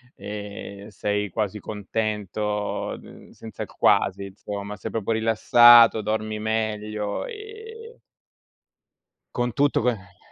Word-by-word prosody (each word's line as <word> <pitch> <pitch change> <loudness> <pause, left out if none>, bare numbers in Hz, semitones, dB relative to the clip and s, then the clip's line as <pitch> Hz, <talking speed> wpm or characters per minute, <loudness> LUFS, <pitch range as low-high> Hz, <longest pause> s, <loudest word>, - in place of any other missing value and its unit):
e 100 -1 -8
sei 105 0 -2
quasi 105 +2 -3
contento, 105 0 -3
mhmm, - - -15
senza 110 -3 -8
il - - -8
quasi 100 - +2
insomma, 100 +1 -7
sei - - -6
proprio 115 0 -2
rilassato, 115 +1 +6
dormi 110 0 -2
meglio 105 -1 -2
e 445 +1 -10 1.3
con 120 -2 -1
tutto 145 -2 +2
che 100 -6 -3
110 Hz, 105 wpm, -24 LUFS, 105-115 Hz, 1.3 s, rilassato